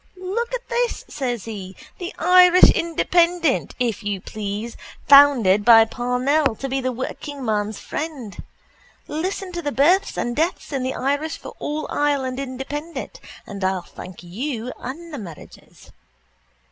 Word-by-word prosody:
Look 395 Hz, +6 st, -3 dB
at -, -, -7 dB
this, 475 Hz, 0 st, -1 dB
says 245 Hz, -6 st, -3 dB
he. 195 Hz, -4 st, -7 dB, 0.2 s
The 355 Hz, +1 st, -4 dB
Irish 360 Hz, +1 st, +7 dB
Independent, 335 Hz, -2 st, +1 dB
if 235 Hz, -4 st, -1 dB
you 205 Hz, -2 st, -3 dB
please, 210 Hz, +3 st, -5 dB, 0.3 s
founded 260 Hz, -9 st, +7 dB
by 225 Hz, 0 st, +8 dB
Parnell 250 Hz, +3 st, 0 dB
to 270 Hz, -, -5 dB
be 270 Hz, 0 st, -1 dB
the 255 Hz, 0 st, -1 dB
workingman's 230 Hz, -4 st, -3 dB
friend. 290 Hz, -10 st, -6 dB, 0.7 s
Listen 370 Hz, +4 st, -3 dB
to 345 Hz, -1 st, -4 dB
the 290 Hz, -3 st, -2 dB
births 320 Hz, -, +3 dB
and 240 Hz, 0 st, -2 dB
deaths 320 Hz, 0 st, -1 dB
in 270 Hz, -, -1 dB
the 260 Hz, +1 st, -2 dB
Irish 285 Hz, +4 st, -1 dB, 0.2 s
all 300 Hz, +1 st, -3 dB
for -, -, -7 dB
Ireland 275 Hz, -3 st, 0 dB
Independent, 285 Hz, -, -6 dB, 0.3 s
and 200 Hz, -1 st, -7 dB
I'll 185 Hz, -1 st, 0 dB
thank 180 Hz, 0 st, -11 dB
you 235 Hz, +6 st, -4 dB
and 320 Hz, +6 st, -8 dB
the 285 Hz, -, -5 dB
marriages. 170 Hz, -7 st, -13 dB
270 Hz, 140 wpm, -22 LUFS, 225-325 Hz, 0.7 s, by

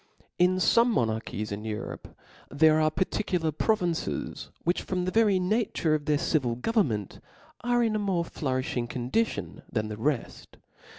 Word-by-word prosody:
In 180 Hz, +1 st, +4 dB
Ibme 230 Hz, +5 st, +4 dB
monarchies 110 Hz, -, -1 dB
in 100 Hz, +1 st, -4 dB
Europe, 110 Hz, -1 st, -6 dB, 0.3 s
there 155 Hz, +2 st, +4 dB
are 155 Hz, -, +4 dB
f 155 Hz, -, -2 dB
par 185 Hz, -, +2 dB
ticular 170 Hz, -8 st, -1 dB
provinces, 175 Hz, -4 st, -1 dB
which 175 Hz, +2 st, +1 dB
from 180 Hz, -1 st, -2 dB
the 185 Hz, -, -1 dB
very 215 Hz, -3 st, +4 dB
nature 185 Hz, -4 st, +1 dB
of 150 Hz, -1 st, -1 dB
their 150 Hz, 0 st, +2 dB
civil 140 Hz, -7 st, 0 dB
government 125 Hz, -, 0 dB, 0.4 s
are 240 Hz, 0 st, +2 dB
in 220 Hz, -2 st, +1 dB
a -, -, +1 dB
more 190 Hz, -4 st, 0 dB
flourifhing 130 Hz, -5 st, -2 dB
condition 130 Hz, -, -2 dB
than 110 Hz, -2 st, -1 dB
the 105 Hz, -, -5 dB
reft. 135 Hz, +2 st, -3 dB
160 Hz, 160 wpm, -28 LUFS, 125-195 Hz, 0.4 s, In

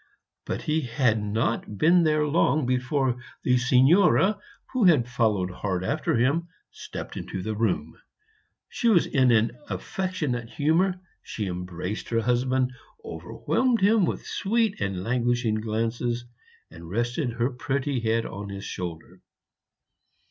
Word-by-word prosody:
But -, -, -3 dB
he 155 Hz, +1 st, +1 dB
had 115 Hz, -3 st, +1 dB
not 105 Hz, 0 st, -2 dB
been 170 Hz, -, +5 dB
there 155 Hz, -2 st, +2 dB
long 150 Hz, -2 st, +2 dB
before 125 Hz, 0 st, 0 dB, 0.3 s
the 125 Hz, 0 st, +3 dB
Signora, 175 Hz, +11 st, +4 dB, 0.3 s
who 250 Hz, -5 st, +2 dB
had 150 Hz, -10 st, +5 dB
followed 105 Hz, -7 st, 0 dB
hard 95 Hz, -1 st, -3 dB
after -, -, 0 dB
him, 140 Hz, +9 st, +1 dB, 0.2 s
stepped -, -, -8 dB
into 95 Hz, -, -5 dB
the 110 Hz, +1 st, -3 dB
room. 95 Hz, -8 st, -1 dB, 0.7 s
She 235 Hz, -, -2 dB
was 185 Hz, -7 st, +5 dB
in 130 Hz, -3 st, +3 dB
an 115 Hz, 0 st, +3 dB, 0.2 s
affectionate 150 Hz, -11 st, -3 dB
humor; 175 Hz, +7 st, +1 dB, 0.2 s
she 105 Hz, -, -5 dB
embraced 90 Hz, +2 st, -5 dB
her 115 Hz, -1 st, +1 dB
husband, 125 Hz, +2 st, +1 dB, 0.3 s
overwhelmed 255 Hz, -, -1 dB
him 205 Hz, 0 st, +4 dB
with -, -, -3 dB
sweet 220 Hz, -, 0 dB
and 95 Hz, -2 st, -2 dB
languishing 120 Hz, -1 st, 0 dB
glances, 115 Hz, +2 st, -2 dB, 0.5 s
and 85 Hz, 0 st, -11 dB
rested 120 Hz, -, -1 dB
her 120 Hz, +3 st, 0 dB
pretty 135 Hz, +1 st, -2 dB
head 115 Hz, 0 st, 0 dB
on 100 Hz, +1 st, -6 dB
his 100 Hz, 0 st, -7 dB
shoulder. 85 Hz, -3 st, -6 dB
125 Hz, 135 wpm, -26 LUFS, 110-155 Hz, 0.7 s, been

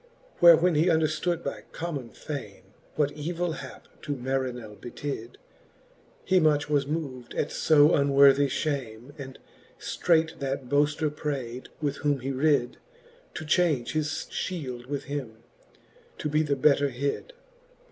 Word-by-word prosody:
Where 170 Hz, -2 st, +9 dB
when 180 Hz, +2 st, +2 dB
he 155 Hz, +3 st, +3 dB
underftood 160 Hz, +1 st, +1 dB
by -, -, -5 dB
common 150 Hz, -8 st, -4 dB
fame, 115 Hz, -4 st, -7 dB, 0.3 s
What 145 Hz, -1 st, +1 dB
evill 170 Hz, +3 st, -3 dB
hap -, -, -9 dB
to 145 Hz, -1 st, -3 dB
Marinell 125 Hz, -4 st, -3 dB
betid, 120 Hz, 0 st, -6 dB, 0.9 s
He 185 Hz, 0 st, +4 dB
much 150 Hz, -3 st, +2 dB
was 145 Hz, -2 st, +1 dB
mov'd 140 Hz, -6 st, -5 dB
at -, -, 0 dB
lb 150 Hz, 0 st, +5 dB
unworthie 140 Hz, -1 st, +5 dB
fhame. 135 Hz, -3 st, -3 dB
And 135 Hz, -1 st, -8 dB, 0.4 s
ftreight 160 Hz, -2 st, +1 dB
that 135 Hz, -1 st, -3 dB
boafter 145 Hz, +2 st, +1 dB
prayd, 130 Hz, -5 st, -4 dB, 0.2 s
with 145 Hz, -1 st, -1 dB
whom 145 Hz, -3 st, 0 dB
he 135 Hz, +2 st, -2 dB
rid, 135 Hz, -2 st, +1 dB, 0.6 s
To 160 Hz, -, -5 dB
change 155 Hz, -6 st, +2 dB
his 155 Hz, -1 st, 0 dB
fhield 145 Hz, -6 st, -4 dB
with 140 Hz, 0 st, -3 dB
him, 125 Hz, -6 st, -6 dB, 0.7 s
to 150 Hz, -, -3 dB
be 150 Hz, +1 st, +2 dB
the 145 Hz, -2 st, 0 dB
better 140 Hz, +1 st, +3 dB
hid. 140 Hz, -, -3 dB
145 Hz, 135 wpm, -27 LUFS, 130-155 Hz, 0.9 s, Where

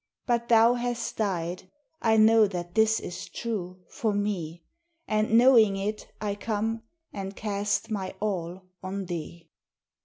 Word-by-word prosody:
But 235 Hz, -1 st, 0 dB
thou 230 Hz, +1 st, +6 dB
hast 240 Hz, -1 st, -3 dB
died, 185 Hz, -3 st, -2 dB, 0.3 s
I 220 Hz, -1 st, +3 dB
know 220 Hz, 0 st, +6 dB
that 175 Hz, -2 st, -5 dB
this 220 Hz, 0 st, +3 dB
is 175 Hz, -, -7 dB
true 185 Hz, -5 st, -5 dB
for 215 Hz, -3 st, -2 dB
me, 175 Hz, -5 st, -3 dB, 0.4 s
And, 215 Hz, +1 st, +2 dB
knowing 230 Hz, -5 st, +6 dB
it, 210 Hz, +2 st, -4 dB
I 205 Hz, -1 st, -2 dB
come, 220 Hz, +2 st, -2 dB, 0.3 s
and 195 Hz, 0 st, -5 dB
cast 205 Hz, +1 st, -2 dB
my 195 Hz, -3 st, -3 dB
all 185 Hz, -3 st, -3 dB, 0.2 s
on 190 Hz, +1 st, -4 dB
thee. 170 Hz, -1 st, -7 dB
205 Hz, 135 wpm, -27 LUFS, 185-225 Hz, 0.4 s, thou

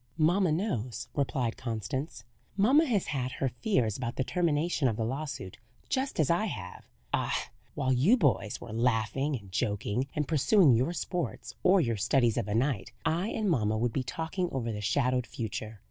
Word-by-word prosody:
"Mamma 175 Hz, +3 st, +3 dB
knows," 150 Hz, -, -2 dB
replied 130 Hz, -5 st, -1 dB
Constance. 115 Hz, -, -4 dB, 0.3 s
"Mamma 265 Hz, +11 st, +5 dB
has 210 Hz, -7 st, +1 dB
had 130 Hz, -5 st, -2 dB
her 135 Hz, 0 st, -1 dB
fears 120 Hz, -, 0 dB
about 120 Hz, -1 st, -3 dB
the 130 Hz, -, 0 dB
termination 160 Hz, -1 st, +1 dB
of 115 Hz, -, 0 dB
the 110 Hz, -, 0 dB
lawsuit, 130 Hz, -6 st, -5 dB, 0.3 s
just 270 Hz, -, -1 dB
as 155 Hz, 0 st, +3 dB
I 175 Hz, +6 st, +2 dB
have. 95 Hz, -, -6 dB, 0.3 s
Ah! -, -, -1 dB, 0.2 s
while 130 Hz, -2 st, +1 dB
you 160 Hz, -, +4 dB
boys 125 Hz, -, +1 dB
were 115 Hz, -2 st, -8 dB
laughing 120 Hz, +5 st, +1 dB
and 100 Hz, -6 st, -9 dB
joking, 105 Hz, +4 st, -1 dB
and 150 Hz, -2 st, -1 dB
pursuing 160 Hz, -, +5 dB
your 130 Hz, +9 st, +2 dB
sports 175 Hz, -, -3 dB
or 185 Hz, 0 st, +5 dB
your 115 Hz, -6 st, 0 dB
studies 120 Hz, +2 st, +2 dB
of 115 Hz, -4 st, -1 dB
a 105 Hz, -, -1 dB
night, 120 Hz, -3 st, 0 dB
I 165 Hz, +4 st, +1 dB
and 220 Hz, -1 st, -1 dB
mamma 110 Hz, -, +2 dB
would 115 Hz, +1 st, 0 dB
be 135 Hz, -, 0 dB
talking 165 Hz, +6 st, -3 dB
over 120 Hz, -4 st, -2 dB
the 105 Hz, -1 st, -4 dB
shadowed 125 Hz, +2 st, +1 dB
future. 110 Hz, -1 st, -5 dB
130 Hz, 175 wpm, -30 LUFS, 115-165 Hz, 0.3 s, Mamma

